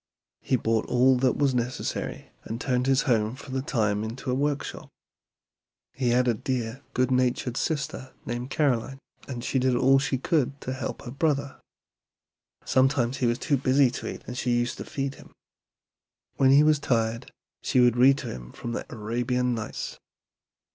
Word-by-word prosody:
He 130 - +1
bought 115 -2 0
all 130 +1 +4
that 130 0 +2
was 140 -2 +2
necessary, 125 +1 -3
and 115 +1 -5
turned 125 -1 0
his 135 -1 +3
home 115 -3 +1
for 135 0 -11
the 130 0 -1
time 110 -8 0
into 120 +4 -4
a - - +1
workshop. 145 +2 -2 1.0
He 130 -2 0
had 125 +1 +3
a 120 - +4
dear, 120 +2 -3
good 130 +1 +2
natured 125 -1 +1
sister 140 -3 -2
named 120 +2 -4
Caroline, 135 -3 0 0.3
and 120 -3 -5
she 135 - 0
did 130 0 +2
all 135 +2 +5
she 135 -1 0
could 140 -1 0
to 130 - -4
help 130 -2 -5
her 120 - -7
brother. 140 -1 -1 1.1
Sometimes 130 -1 +2
he 125 - +1
was 120 0 +1
too 140 +2 +1
busy 130 0 +3
to - - -6
eat - - -9
and 125 - -6
she 125 -1 +1
used 120 0 -1
to - - -5
feed 135 -1 -3
him. - - -16 1.0
When 135 - +5
he 140 +2 +7
was 155 -1 +4
tired 115 -4 -1 0.3
she 130 - +1
would 120 -1 +5
read 135 +3 +6
to - - -6
him - - -10
from 120 - -6
the - - -4
'Arabian 120 +3 -1
Nights.'" 110 -2 -5
125 Hz, 175 wpm, -26 LUFS, 120-135 Hz, 1.1 s, he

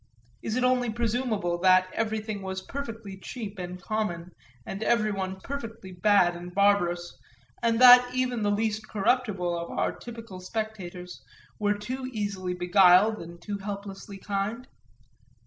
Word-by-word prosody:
is 220 - -3
it 255 - +1
only 250 -1 +2
presumable 220 -6 -1
that 185 0 +5
everything 215 -2 -2
was 190 0 -5
perfectly 225 -8 -7
cheap 210 -3 -7
and 180 0 -6
common 180 -4 -3 0.3
and 195 - -6
everyone 200 -5 0
perfectly 230 -8 -7
bad 180 -1 +3
and 175 +1 -9
barbarous 175 -4 +2 0.4
and 230 -1 +2
that 250 0 +9
even 250 -2 -1
the 205 - +1
least 215 +1 -1
corruptible 200 -5 0
of 170 0 -5
our - - 0
typical 230 -5 -9
spectators 185 -3 -6 0.4
were 205 -1 +1
too 255 +5 -5
easily 200 -4 -3
beguiled 185 +3 +5
and 170 +1 -10
too 205 -1 -4
helplessly 200 0 -7
kind? 205 +5 -3
205 Hz, 135 wpm, -27 LUFS, 185-225 Hz, 0.4 s, that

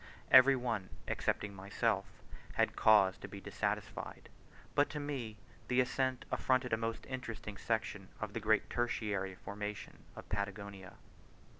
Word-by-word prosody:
Every 130 +1 +9
one, 115 -7 -2 0.2
excepting 105 -1 -1
myself, 100 +1 0 0.5
had - - +2
cause 95 -4 +5
to - - -7
be - - -8
dissatisfied; - - -3 0.4
but 145 +3 +4
to 150 - -4
me 130 -7 -4 0.3
the 125 0 +2
ascent 130 0 +1
afforded 130 -2 +2
a - - +7
most 115 0 -3
interesting 115 -5 -5
section 105 -3 -2
of 105 -2 -4
the 115 - -2
great 110 -1 +3
tertiary 105 -6 -1
formation 105 +1 -6 0.2
of - - -9
Patagonia. 100 -1 -4
110 Hz, 135 wpm, -35 LUFS, 100-125 Hz, 0.5 s, Every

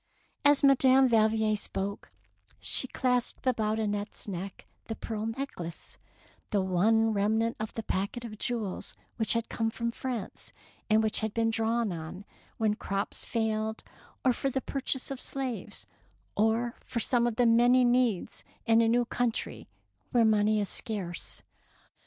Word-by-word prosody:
As 285 0 +5
Madame 270 -1 +6
Valvier 220 -2 +3
spoke, 200 -1 -5 0.5
she 260 - +3
clasped 250 -1 0
181 215 -4 0
DEEDS - - -8
OF - - -4
DABING 200 - -4
about 175 - -3
Annette's 195 - -15
neck - - -19 0.2
the 225 - -4
pearl 220 -1 -4
neck 270 +2 -5
lace, 170 -1 -6 0.5
the 200 -3 +1
only 220 +5 +3
remnant 220 +3 +1
of 215 0 -3
the 225 - -3
packet 200 +5 -2
of 215 -2 -8
jewels 225 -6 -2 0.2
which 220 -2 +4
had 230 -1 -1
come 225 -1 -1
from 235 +1 -2
France, 235 -4 -4 0.4
and 220 +1 +4
which 215 - +2
had 220 -1 -3
been 225 0 +2
drawn 225 -1 0
on 170 +4 -7 0.3
when 215 -2 +2
crops 200 -2 -3
failed, 220 -1 -1 0.4
or 255 - +5
for 275 - -1
the 265 - -1
purchase 270 0 -2
of 270 - -4
slaves, 265 -4 -4 0.5
or 225 +3 +1
for 235 - -3
some 240 0 +3
of 235 - -2
the 245 +1 +3
many 245 +2 +5
needs 240 -6 +1 0.2
in 225 0 +5
a 230 - +3
new 240 +1 +3
country 240 -1 -2 0.4
where 235 -3 +4
money 215 0 +3
is 205 - -1
scarce. 190 -6 -3
225 Hz, 165 wpm, -29 LUFS, 215-240 Hz, 0.5 s, Madame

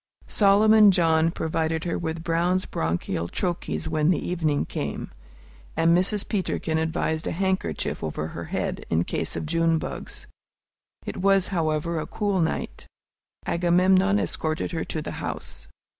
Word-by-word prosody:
Solomon 210 +1 +6
John 165 -3 +3
provided 160 0 -1
her 170 - -1
with 160 -1 -3
Brown's 175 +2 +1
Bronchial 85 +1 -2
Troches 175 -3 -2
when 155 0 +1
the 180 - +3
evening 160 -5 0
came, - - -4 0.7
and 165 +1 +4
Mrs. 195 +3 +1
Peterkin 175 -5 -1
advised 160 0 -1
a - - -1
handkerchief 185 - -1
over 75 0 -3
her 85 +1 -6
head, - - -3
in 80 +1 +2
case - - -3
of - - -3
June 165 +1 +2
bugs. - - -6 0.8
It - - -5
was, 195 0 +3
however, 165 -2 0
a 155 - -4
cool 205 -3 -1
night. 160 - -3 0.6
Agamemnon 185 +3 +3
escorted 155 -6 -1
her 165 -2 -2
to 155 - -3
the - - -5
house. 60 - -3
165 Hz, 145 wpm, -25 LUFS, 160-185 Hz, 0.8 s, Solomon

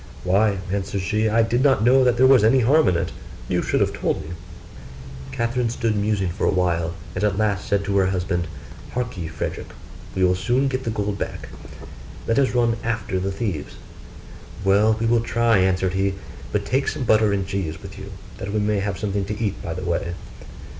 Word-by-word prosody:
'Why,' 100 +2 +2
answered 100 0 -2
she, 110 +4 +1
'I 115 +1 +3
did 120 +2 +1
not 135 -6 +4
know 130 +3 +5
there 125 0 +4
was 130 -4 +6
any 125 +4 +5
harm 150 +7 +4
in 90 - +3
it; 85 - -1 0.4
you - - 0
should - - 0
have - - +1
told - - -1
me.' 80 - -7 1.0
Catherine 120 0 -1
stood 115 -2 -1
musing 100 -3 0
for 95 - -1
a - - +3
while, 85 -2 0 0.2
and - - -3
at 100 -2 +1
last 105 -3 0
said 100 0 +1
to 100 0 0
her 95 -1 +3
husband, 90 -2 -1 0.5
'Hark 125 -1 -2
ye, 85 -3 -4
Frederick, 80 0 -5 0.5
we 95 - +1
will 90 0 +4
soon 120 +9 +1
get 130 0 -3
the - - -1
gold 105 -2 -2
back: - - -5 0.8
let 115 +3 +2
us 135 -2 +1
run 120 -1 +2
after 110 -5 -2
the 95 +1 -2
thieves.' 95 -7 -4 0.9
'Well, 105 +3 +4
we 115 - 0
will 115 0 +3
try,' 115 -2 +2
answered 95 0 +1
he; 95 0 0 0.4
'but 105 -1 -1
take 135 +6 0
some 135 - -2
butter 110 -2 +4
and 100 -1 0
cheese 95 -5 -3
with 95 +1 -10
you, 100 +1 -8 0.3
that 100 +1 -4
we 110 - -1
may 105 0 +1
have 100 -2 -2
something 100 -2 -2
to 105 +1 -5
eat 105 -4 -2
by 80 - -4
the 90 +1 -5
way. 85 0 -1
100 Hz, 205 wpm, -22 LUFS, 95-115 Hz, 1.0 s, was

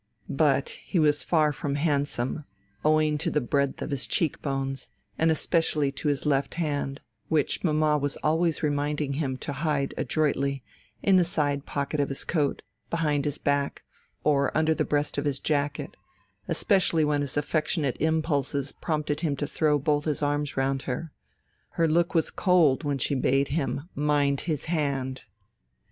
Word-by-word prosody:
But 140 -1 +2
he - - -2
was 150 -2 +3
far 155 -3 +3
from 140 0 -3
handsome, 145 -2 0 0.4
owing 155 -1 +3
to 170 +3 0
the 150 - +1
breadth 140 +1 0
of - - -5
his 140 -2 0
cheek 165 -4 +1
bones, 135 -1 -3 0.3
and 160 - +2
especially 155 -2 +1
to 140 +2 -4
his 145 0 0
left 140 -2 +1
hand, 145 -4 -2 0.3
which 155 -3 0
mamma 155 -2 +2
was 145 0 -2
always 160 +1 +1
reminding 145 -1 0
him 130 -3 -2
to 145 - -4
hide 140 -1 -1
adroitly, 140 -3 0 0.4
in 195 -2 +5
the 180 - +5
side 145 -4 -1
pocket 140 +1 -2
of 140 - +1
his 135 - -3
coat, 150 -5 0 0.3
behind 150 -4 0
his 145 -1 0
back, 140 0 -1 0.4
or 140 -2 +2
under 160 0 +3
the - - 0
breast 145 -1 0
of 145 - -3
his 140 -2 0
jacket 145 -1 -1 0.5
especially 180 -6 +2
when 145 -1 +1
his 140 0 -2
affectionate 150 -2 0
impulses 145 -3 0
prompted 150 -2 -2
him 155 -4 0
to 145 - -2
throw 150 0 +1
both 145 +1 0
his 150 -1 -1
arms 145 -1 -1
round 135 0 +1
her. 145 +5 -3 0.7
Her 165 - +4
look 170 +3 +1
was 165 - +2
cold 170 -7 +3
when 145 -2 0
she 135 - 0
bade 135 +1 +2
him 145 0 -2
mind 145 -1 +1
his 150 -4 -1
hand. 140 -5 -2
145 Hz, 165 wpm, -27 LUFS, 140-155 Hz, 0.7 s, in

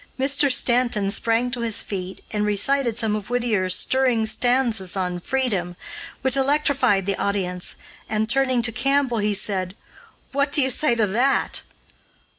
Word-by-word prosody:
Mr. 280 +1 +2
Stanton 240 -6 +1
sprang 230 +3 0
to 240 - -4
his 225 -1 +1
feet 190 -2 -6
and 210 -1 -1
recited 230 +4 +1
some 220 -3 0
of 210 -1 -6
Whittier's 220 -7 0
stirring 255 -4 +2
stanzas 225 -5 +1
on 180 -1 -2
freedom, 195 -6 -2 0.5
which 265 -1 +2
electrified 275 -8 +2
the 200 0 0
audience, 180 -3 -2 0.3
and, 215 0 0
turning 255 0 +1
to 230 - -1
Campbell, 265 -1 0
he 210 0 0
said: 190 -2 -2 0.6
"What 280 +1 0
do 295 - +3
you 265 -1 +4
say 275 -2 +2
to 225 -2 +2
that?" 245 +7 +1
230 Hz, 150 wpm, -22 LUFS, 200-265 Hz, 0.6 s, you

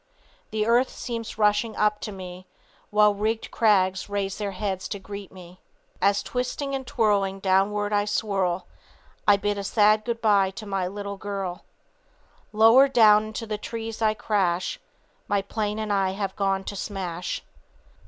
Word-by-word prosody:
The 215 -1 -1
earth 240 +3 +3
seems 230 -3 -6
rushing 210 +1 +2
up 210 0 +1
to 215 - -5
me; 185 -1 -9 0.4
While 210 0 +4
rigged 220 +2 -2
crags 190 -4 +2
raise 200 -1 -2
their 205 -1 -2
heads 190 -1 -3
to 205 - -4
greet 200 0 -8
me. 180 -1 -14 0.4
As 200 +1 +3
twisting 250 +3 -3
and 265 -1 -3
twirling 200 -4 +1
downward 200 +2 +1
I 205 0 +2
swirl; 195 -4 -1 0.6
I 205 -1 +7
bid 205 0 -1
a - - -4
sad 215 +1 +3
good 235 0 -3
bye 205 -4 +3
to 220 - -6
a 195 -3 -2
little 200 0 -6
girl. 195 -3 -5 0.9
Lower 225 +5 +6
down 215 -5 +5
into 220 +1 -5
the 215 -1 -4
trees 225 0 -6
I 215 -1 +3
crash; 185 -5 0 0.5
My 200 -3 +1
plane 210 +1 -2
and 215 -1 -2
I 190 -1 +1
have 195 -1 -3
gone 195 -1 0
to 200 - -6
smash. 185 -4 -4
205 Hz, 160 wpm, -25 LUFS, 195-215 Hz, 0.9 s, I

